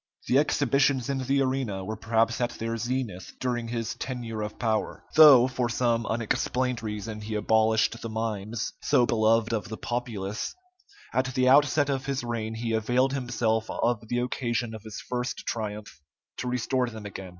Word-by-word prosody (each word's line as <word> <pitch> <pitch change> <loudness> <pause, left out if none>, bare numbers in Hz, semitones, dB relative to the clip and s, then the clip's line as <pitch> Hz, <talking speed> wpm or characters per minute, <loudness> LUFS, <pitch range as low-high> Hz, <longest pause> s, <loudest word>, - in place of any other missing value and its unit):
The 130 - +4
exhibitions 140 -3 +2
in 135 - -1
the 135 +1 +1
arena 130 -8 -2
were 110 +3 -3
perhaps 115 +2 +1
at 120 - +2
their 115 0 -2
zenith 120 -5 -3
during 120 -2 -1
his 115 -1 -3
tenure 120 -4 -5
of 105 0 -5
power. 110 -2 -1
Though, 145 -6 +9
for 125 -2 -1
some 115 -1 +1
unexplained 120 +2 -1
reason, 105 0 -5
he 110 +1 -4
abolished 110 +1 +2
the 115 - -5
mimes, 110 0 -3
so 120 - +3
beloved 115 0 +2
of 110 0 -2
the 110 - -5
populace, 115 - -3 0.6
at 130 - +2
the 130 0 +3
outset 145 +1 +5
of 135 0 -2
his 135 -2 -1
reign, 115 -2 -3
he 115 0 -2
availed 125 +4 +2
himself 115 -4 0
of 115 -2 -1
the 120 - -1
occasion 120 -2 -1
of 110 - -7
his 110 -1 -8
first 125 +1 -3
triumph 105 -6 -5 0.4
to 125 - -4
restore 125 +1 0
them 110 -2 -9
again. 95 -2 -7
115 Hz, 170 wpm, -27 LUFS, 110-125 Hz, 0.6 s, Though